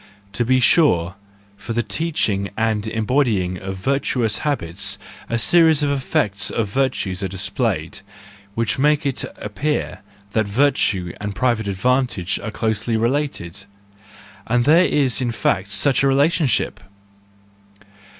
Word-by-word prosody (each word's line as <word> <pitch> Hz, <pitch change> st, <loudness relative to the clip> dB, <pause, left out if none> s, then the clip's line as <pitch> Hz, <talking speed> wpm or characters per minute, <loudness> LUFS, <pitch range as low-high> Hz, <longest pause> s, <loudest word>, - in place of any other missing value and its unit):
To 120 Hz, -, 0 dB
be 130 Hz, +2 st, +3 dB
sure, 95 Hz, -, +3 dB, 0.4 s
for 110 Hz, +3 st, -6 dB
the 120 Hz, +1 st, 0 dB
teaching 110 Hz, -13 st, -1 dB
and 110 Hz, -1 st, 0 dB
embody¬ 115 Hz, +2 st, +1 dB
ing 90 Hz, 0 st, -3 dB
of 95 Hz, 0 st, -5 dB
virtuous 120 Hz, -1 st, 0 dB
habits 100 Hz, -, -1 dB, 0.3 s
a 115 Hz, -, 0 dB
series 160 Hz, -, +4 dB
of 145 Hz, -, +1 dB
effects 105 Hz, -7 st, 0 dB
of 110 Hz, -3 st, -2 dB
virtue 130 Hz, -5 st, -1 dB
are 95 Hz, -, -1 dB
displayed, 95 Hz, -2 st, -3 dB, 0.6 s
which 115 Hz, +2 st, -1 dB
make 150 Hz, +2 st, +2 dB
it 135 Hz, -2 st, -1 dB
appear 130 Hz, +9 st, -3 dB, 0.3 s
that 110 Hz, -1 st, 0 dB
virtue 100 Hz, -7 st, +1 dB
and 105 Hz, -1 st, -4 dB
private 115 Hz, -1 st, 0 dB
advantage 105 Hz, -2 st, 0 dB
are 115 Hz, -, -5 dB
closely 110 Hz, +1 st, -1 dB
related,—and 105 Hz, -, -4 dB
there 165 Hz, +5 st, +5 dB
is 135 Hz, -5 st, +1 dB
in 120 Hz, -2 st, 0 dB
fact 105 Hz, -3 st, -1 dB
such 135 Hz, +4 st, +3 dB
a 140 Hz, -, +3 dB
relationship! 140 Hz, 0 st, +1 dB
115 Hz, 130 wpm, -20 LUFS, 100-135 Hz, 0.6 s, there